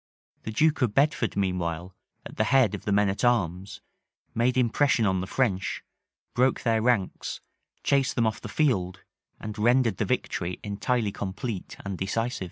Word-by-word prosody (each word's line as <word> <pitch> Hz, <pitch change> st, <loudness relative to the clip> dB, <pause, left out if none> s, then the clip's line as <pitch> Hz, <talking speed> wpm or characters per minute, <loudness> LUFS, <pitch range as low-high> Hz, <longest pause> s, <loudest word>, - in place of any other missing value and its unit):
The 110 Hz, -, -3 dB
duke 155 Hz, +7 st, +2 dB
of 115 Hz, -5 st, +1 dB
Bedford, 140 Hz, -6 st, +2 dB
meanwhile, 90 Hz, -2 st, -2 dB, 0.3 s
at -, -, -10 dB
the -, -, +2 dB
head 130 Hz, -7 st, +4 dB
of -, -, -6 dB
the 105 Hz, -, 0 dB
men 105 Hz, 0 st, +4 dB
at 95 Hz, +4 st, -2 dB
arms, 95 Hz, -6 st, 0 dB, 0.5 s
made 125 Hz, +2 st, +1 dB
impression 125 Hz, -1 st, +3 dB
on 95 Hz, -2 st, +1 dB
the 95 Hz, -, -4 dB
French, 100 Hz, -6 st, -1 dB, 0.5 s
broke 130 Hz, +1 st, +2 dB
their 115 Hz, -2 st, +2 dB
ranks, 115 Hz, -5 st, 0 dB, 0.4 s
chased 135 Hz, -2 st, +2 dB
them 120 Hz, -, +2 dB
off 110 Hz, -1 st, -1 dB
the 110 Hz, -, -7 dB
field, 95 Hz, -, 0 dB, 0.4 s
and 105 Hz, 0 st, -6 dB
rendered 120 Hz, -2 st, +3 dB
the -, -, 0 dB
victory 85 Hz, +1 st, -2 dB
entirely 105 Hz, +2 st, -1 dB
complete 100 Hz, +1 st, -5 dB
and 100 Hz, -2 st, -4 dB
decisive. 115 Hz, +6 st, -1 dB
110 Hz, 165 wpm, -27 LUFS, 95-125 Hz, 0.5 s, head